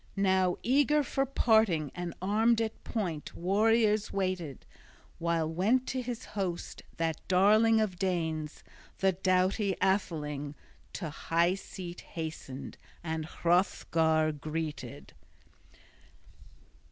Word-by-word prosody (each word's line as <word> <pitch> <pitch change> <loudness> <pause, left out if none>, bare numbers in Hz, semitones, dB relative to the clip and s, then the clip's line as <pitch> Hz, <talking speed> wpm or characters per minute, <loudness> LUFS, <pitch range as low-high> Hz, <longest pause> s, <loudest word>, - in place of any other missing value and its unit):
Now 190 -2 +2
eager 290 +3 +3
for 270 +1 -1
parting 220 - +3
and 175 -2 -5
armed 220 +4 +3
at 225 -1 -3
point 175 -10 -4
warriors 215 +3 +2
waited, 185 -8 -3 0.5
while 165 -1 0
went 205 +11 +1
to 255 - -1
his 245 0 -5
host 185 -4 -4 0.2
that 165 -1 -1
Darling 215 +4 +5
of 205 -5 -1
Danes. 160 -5 -2 0.3
The 190 0 +3
doughty 185 +2 +1
atheling 150 -7 -1 0.4
to 165 -6 -4
high 170 +4 +1
seat 180 -2 -8
hastened 155 -5 -7 0.2
and 160 -1 -3
Hrothgar 160 -3 +2
greeted. 155 +1 -5
185 Hz, 105 wpm, -30 LUFS, 160-215 Hz, 0.5 s, Darling